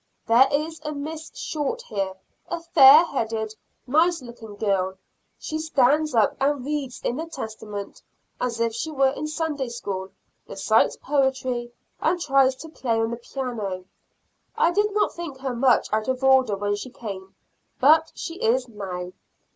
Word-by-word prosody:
There 235 +4 +6
is 310 +3 -2
a 300 0 -3
Miss 310 +2 -6
Short 315 - -3
here 195 -2 -3 0.3
a 345 - -2
fair 315 -1 +8
haired, 225 -7 -2 0.3
nice 325 +6 +3
looking 230 -3 -10
girl; 190 -2 0 0.4
she 310 - -4
stands 300 -1 +2
up 220 -2 +3
and 275 -1 +1
reads 285 -3 -3
in 245 - -1
the 325 +2 -4
Testament 215 -8 -7 0.4
as 235 -2 -2
if 230 -1 +1
she 230 +8 -3
were 270 -3 +2
in 305 +2 -4
Sunday 305 -4 -2
school, 195 -5 -5 0.4
recites - - +2
poetry, 260 -4 0 0.3
and 350 +3 +1
tries 270 -4 +3
to 320 +5 -10
play 235 -7 -1
on 225 0 0
the 235 - -3
piano. 230 -7 -5 0.7
I 335 - +4
did 415 +3 +1
not 425 - +2
think 335 -6 -7
her 260 -1 -3
much 250 +1 +3
out 215 0 0
of 260 0 -1
order 260 -5 +4
when 205 +1 -1
she 230 +5 -7
came, 195 -6 -8 0.4
but 315 +4 +5
she 335 +1 -6
is 250 +3 +2
now. 185 -5 -6
260 Hz, 160 wpm, -24 LUFS, 225-305 Hz, 0.7 s, fair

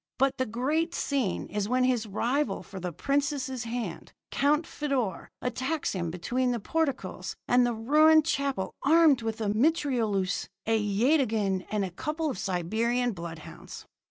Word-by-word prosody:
"But 270 +1 +2
the 260 - 0
great 300 +9 -1
scene 265 -10 -1
is 205 0 -3
when 255 +1 +2
his 245 -3 +1
rival 235 +3 -1
for 195 - -9
the 180 -1 -4
princess' 275 - -1
hand, 235 +1 -5 0.2
Count 295 +3 +2
Feodor, 260 - -2
attacks 260 +5 -1
him 175 -3 -2
between 240 +10 -1
the 240 -1 0
portcullis 250 - -2
and 245 0 +4
the 240 - -1
ruined 305 +7 +5
chapel, 275 -11 -1
armed 310 -3 +5
with 225 -1 -3
a 210 - 0
mitrailleuse, 225 - +1 0.2
a 225 - +2
yataghan, 215 -3 +1
and 210 -2 0
a 185 - -6
couple 305 - -2
of 190 - -6
Siberian 220 +7 0
bloodhounds. 170 -4 -9
245 Hz, 150 wpm, -28 LUFS, 205-280 Hz, 0.2 s, ruined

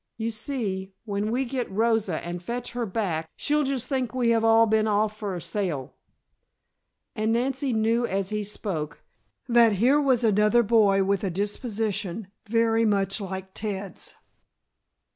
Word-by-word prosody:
You 225 0 -2
see, 210 -5 -3
when 205 0 -2
we 255 +4 0
get 250 -1 -3
Rosa 215 -4 0
and 175 0 -5
fetch 240 +6 -4
her 240 -1 -3
back 180 -6 -2
she'll 300 +1 +1
just 265 -3 -1
think 255 -3 -2
we 245 -2 +2
have 225 -1 +2
all 225 0 +6
been 220 0 +2
off 210 0 +1
for 205 -3 -4
a - - -4
sail." 170 -11 -3 1.2
And 215 +1 0
Nancy 265 +3 0
knew 230 +1 +1
as 195 -2 -1
he 210 0 -2
spoke, 190 -7 -5 0.4
that 235 -3 +5
here 255 +9 +3
was 260 -4 +2
another 210 +2 +4
boy 205 -3 +4
with 195 0 0
a 195 - 0
disposition 205 0 -2 0.2
very 230 +1 +2
much 200 -2 +1
like 190 -1 -6
Ted's. 200 -3 -4
215 Hz, 155 wpm, -26 LUFS, 195-235 Hz, 1.2 s, all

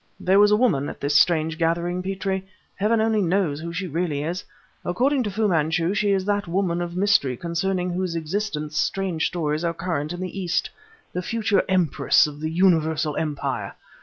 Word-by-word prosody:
"There 190 +2 +3
was 205 0 +6
a 210 - +5
woman 180 - +2
at - - -9
this 145 +1 -1
strange 160 +1 +3
gathering, 170 +2 0
Petrie. 190 0 -2 0.3
Heaven 215 +3 +1
only 220 -1 +2
knows 175 -5 +1
who 170 +1 -5
she 185 +3 -3
really 160 -3 -2
is. 175 +4 -3 0.4
According 260 +9 +1
to 220 - -1
Fu 215 +2 0
Manchu 165 0 +1
she 205 0 +1
is 190 -1 +1
that 205 -1 0
woman 175 -1 0
of 175 0 -4
mystery 185 -11 +2
concerning 180 +3 -1
whose 180 -1 -2
existence 160 -2 -3
strange 180 +1 0
stories 155 -2 -2
are 170 -1 -1
current 165 -4 -2
in 175 - -5
the 185 +1 -5
East; 175 -2 -1 0.4
the 180 - -2
future 210 0 +1
Empress 180 -5 +3
of 150 0 -7
a 155 - -1
universal 160 -3 +2
empire! 140 -9 -3
175 Hz, 185 wpm, -23 LUFS, 160-195 Hz, 0.4 s, was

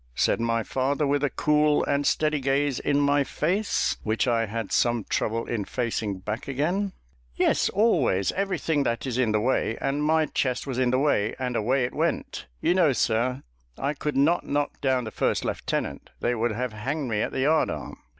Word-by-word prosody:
said - - +1
my 115 -1 0
father, 135 +5 0
with 145 0 +1
a 145 - +2
cool 150 +2 +2
and 140 0 +1
steady 155 -1 +1
gaze 135 0 0
in 145 0 +1
my 145 0 +3
face, 185 +10 0
which 110 +3 0
I 115 -2 +1
had 110 -1 -4
some 120 -2 +2
trouble 115 +3 -1
in 110 -4 -2
facing 110 -4 -3
back 105 +4 -4
again. 175 +9 -1 0.4
"Yes; - - +2
always 150 - +2
everything 185 -6 -1
that 115 -3 -1
is 130 -1 -2
in 120 -4 +2
the 105 - +2
way, 115 -1 0
and 140 +2 -1
my 160 +1 +3
chest 130 -3 -1
was 130 -3 -3
in 130 -1 +2
the 130 - +2
way, 130 -7 +1
and 125 -2 -3
away 125 +4 +1
it 125 - -2
went. - - -2
You - - +3
know, 170 -6 +4
sir, 120 +2 0 0.3
I 140 +2 -1
could 150 -1 -3
not 155 +6 +3
knock 145 0 -2
down 130 -2 +1
the 110 - -6
first - - 0
lieutenant: - - -3
they 120 - 0
would 120 0 0
have 125 +1 -3
hanged 135 +7 -3
me 110 -2 0
at - - -1
the - - -2
yard 155 +3 +3
arm." - - -6
130 Hz, 200 wpm, -26 LUFS, 115-145 Hz, 0.4 s, know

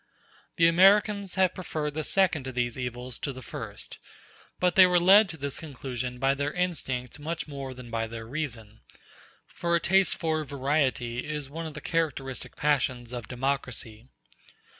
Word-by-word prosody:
The 165 - +4
Americans 195 +3 +4
have 185 -2 +3
preferred 155 -5 -3
the 155 +1 -2
second 175 -8 +1
of 130 - -6
these 120 -2 0
evils 125 -1 -4
to 140 - -3
the 130 -1 -9
first; - - -8 0.6
but 180 -1 +2
they 185 -1 +8
were 180 -1 +4
led 195 +4 +7
to 160 - -6
this 140 -1 -3
conclusion 125 -4 -5
by 135 +2 +2
their 145 +1 -2
instinct 145 -9 -2
much 160 +2 -4
more 135 -3 -6
than 125 -2 -10
by 115 0 -1
their 115 0 -7
reason; 115 -5 -5 0.7
for 170 0 -1
a - - +3
taste 190 +2 +3
for 160 -2 -1
variety 135 -4 0
is 150 -2 -5
one 165 +2 -5
of 155 - -9
the 150 - -7
characteristic 140 -6 -2
passions 130 -4 0
of 120 -3 -5
democracy. 125 -3 -3
140 Hz, 165 wpm, -28 LUFS, 125-165 Hz, 0.7 s, they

